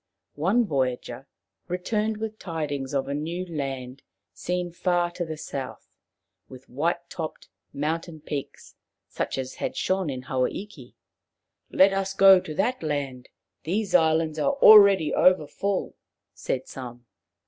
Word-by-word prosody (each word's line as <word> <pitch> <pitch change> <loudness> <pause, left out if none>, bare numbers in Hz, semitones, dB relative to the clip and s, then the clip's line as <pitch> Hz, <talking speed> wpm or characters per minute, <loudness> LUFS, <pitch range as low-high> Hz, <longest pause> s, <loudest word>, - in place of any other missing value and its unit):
One 200 +10 +2
voyager 130 -7 -2 0.4
returned 210 +4 -1
with 220 0 -5
tidings 145 -6 -4
of 135 - 0
a 140 - -2
new 165 +5 -3
land 135 -5 -5 0.3
seen 180 0 -3
far 175 0 0
to 175 0 -4
the 160 -2 -6
south, 135 -3 -7 0.6
with 130 0 -13
white 170 +6 -2
topped 160 -2 -7 0.2
mountain 160 +3 -3
peaks 145 -2 -7 0.3
such - - -3
as 130 -1 -5
had - - -3
shone 185 -3 0
in 130 -2 -5
Hawa 130 -1 0
iki. 165 -11 -10 0.4
" - - -59 0.3
Let 195 +1 +5
us 195 0 -2
go 195 -1 +8
to 155 - -7
that 250 +9 0
land. 140 -5 -3 0.3
These 195 +3 -2
islands 160 -2 +3
are 280 - +2
already 200 - +7
overfull/' 185 +3 +1 0.4
said 130 0 -3
some. 120 -2 -9
160 Hz, 135 wpm, -25 LUFS, 140-185 Hz, 0.6 s, go